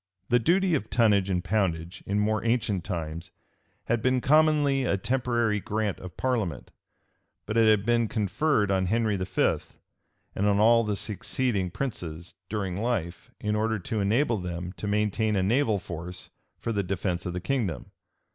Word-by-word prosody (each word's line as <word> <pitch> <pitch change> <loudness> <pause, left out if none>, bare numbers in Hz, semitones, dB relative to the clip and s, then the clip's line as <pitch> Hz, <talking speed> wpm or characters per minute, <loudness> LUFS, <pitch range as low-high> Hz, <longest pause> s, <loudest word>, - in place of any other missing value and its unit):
The 120 - +4
duty 180 +8 +2
of 150 - -1
tonnage 105 -5 +3
and 90 -2 0
poundage, 90 -3 -1
in 100 - 0
more 105 +1 +1
ancient 115 -6 0
times, 85 -3 -5 0.5
had 120 -1 0
been 130 +2 +2
commonly 145 -1 +3
a 100 - +1
temporary 120 0 0
grant 105 0 -2
of 90 -1 -10
parliament; 110 - -2 0.7
but 110 - -4
it 115 -1 +5
had 105 -2 +3
been 120 -1 +2
conferred 105 - +1
on 95 -1 +1
Henry 110 +1 +1
V., 95 -1 +1 0.8
and 100 - 0
all 110 +3 +5
the 105 -2 -1
succeeding 105 -1 -1
princes, 85 - -5 0.2
during 95 -4 -2
life, 95 -8 -2
in 105 0 -1
order 110 +1 0
to 110 +3 -3
enable 115 +5 +2
them 90 -1 -5
to 105 - -4
maintain 105 +1 +1
a 95 - +2
naval 110 +1 +2
force 90 0 -7 0.3
for 115 - -3
the 100 -2 0
defence 90 -1 -2
of 90 - -3
the 90 - -2
kingdom. 95 - -2
105 Hz, 160 wpm, -27 LUFS, 95-115 Hz, 0.8 s, it